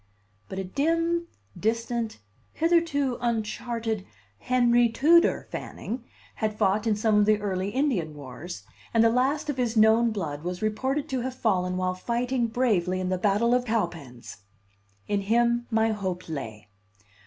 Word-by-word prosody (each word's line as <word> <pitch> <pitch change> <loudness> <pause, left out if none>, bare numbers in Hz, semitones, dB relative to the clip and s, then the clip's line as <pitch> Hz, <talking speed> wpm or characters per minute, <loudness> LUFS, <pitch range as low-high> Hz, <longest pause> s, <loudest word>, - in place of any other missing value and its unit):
But 190 - -6
a 190 - -2
dim, 330 - 0 0.3
distant, 230 +1 -1 0.4
hitherto 320 -6 +1
uncharted 225 -2 -2 0.4
Henry 240 - +3
Tudor 320 +9 +4
Fanning 240 +2 -6 0.3
had 215 -1 -2
fought 210 +1 +1
in 215 - +3
some 210 0 +2
of 205 - +4
the 215 -1 +4
early 195 -1 -2
Indian 205 - -1
wars, 140 - -8 0.3
and 225 - +6
the 230 - +5
last 270 +5 +1
of 290 -3 -2
his 240 -2 0
known 220 +2 +5
blood 160 -9 -4
was 180 +3 -4
reported 265 +7 -1
to 265 - -1
have 255 +1 -4
fallen 185 -7 0
while 185 0 0
fighting 240 +5 -1
bravely 210 -7 +1
at 185 0 -2
the 185 - 0
battle 210 +5 +2
of 250 0 +3
Cowpens. 170 - -4 0.7
In 205 -1 0
him 235 +3 +2
my 225 -1 +2
hope 190 -4 -4
lay. 110 -9 -6
225 Hz, 150 wpm, -26 LUFS, 185-245 Hz, 0.7 s, and